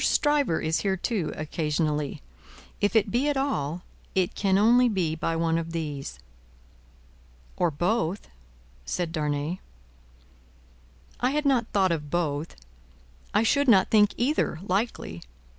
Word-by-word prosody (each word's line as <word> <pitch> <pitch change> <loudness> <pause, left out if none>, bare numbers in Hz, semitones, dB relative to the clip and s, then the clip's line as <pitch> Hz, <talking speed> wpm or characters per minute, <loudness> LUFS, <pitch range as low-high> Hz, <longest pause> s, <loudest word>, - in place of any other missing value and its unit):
Stryver 290 - +2
is 160 +1 0
here 195 -1 0
too, 190 -3 -2
occasionally. 150 - -2 0.6
If 205 +2 +1
it 215 -2 +3
be 260 +5 +1
at 290 - 0
all, 175 - -1 0.3
it 185 -2 +1
can 195 -1 +2
only 240 +4 +5
be 180 -7 0
by 165 +1 -2
one 165 0 +1
of 165 0 -6
these." 145 - -4 1.4
"Or 175 - +2
both," 175 +4 -1 0.6
said 170 - -2
Darnay. 150 +2 -2 1.6
"I 250 - +2
had 295 +2 -1
not 255 -5 +2
thought 190 -3 +3
of 150 -3 -2
both; 155 -1 -2 0.8
I 210 - +3
should 280 +5 +2
not 195 -6 +5
think 210 -2 +4
either, 250 - 0
likely. 185 - -2
180 Hz, 130 wpm, -26 LUFS, 160-225 Hz, 1.6 s, only